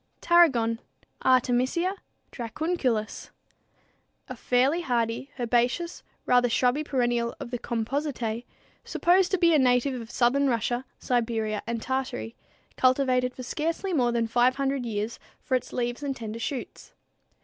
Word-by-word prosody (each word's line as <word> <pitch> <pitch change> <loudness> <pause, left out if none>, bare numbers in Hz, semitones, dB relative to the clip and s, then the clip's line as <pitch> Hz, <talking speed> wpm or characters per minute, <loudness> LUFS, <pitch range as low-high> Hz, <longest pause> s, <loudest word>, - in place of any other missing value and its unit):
=Tarragon= 255 -10 +4 0.4
(Artemisia 255 +8 +2 0.4
Dracunculus, 245 -3 -2
Linn.), - - -22 1.0
a 255 - -5
fairly 255 +8 +2
hardy, 240 -1 -1
herbaceous 245 +8 0 0.2
rather 245 -1 +4
shrubby 250 +5 +2
perennial 240 -4 0
of 235 - -7
the 245 - -3
Compositæ, 235 -1 -2 0.4
supposed 360 +1 +3
to 385 - +1
be 340 -2 +4
a 305 - +5
native 250 0 +2
of 225 - -10
southern 265 +4 +2
Russia, 240 +2 -1
Siberia, 225 -3 -1
and 230 -1 -3
Tartary, 255 - -3 0.4
cultivated 255 -1 +2
for 255 - -7
scarcely 330 +8 -2
more 245 -6 +2
than 235 -1 +1
500 255 +2 +1
years 215 +1 -3 0.2
for - - -5
its 255 - 0
leaves 240 +1 -2
and 280 -2 -2
tender 225 -1 -6
shoots. 255 +2 -6
250 Hz, 130 wpm, -27 LUFS, 235-275 Hz, 1.0 s, a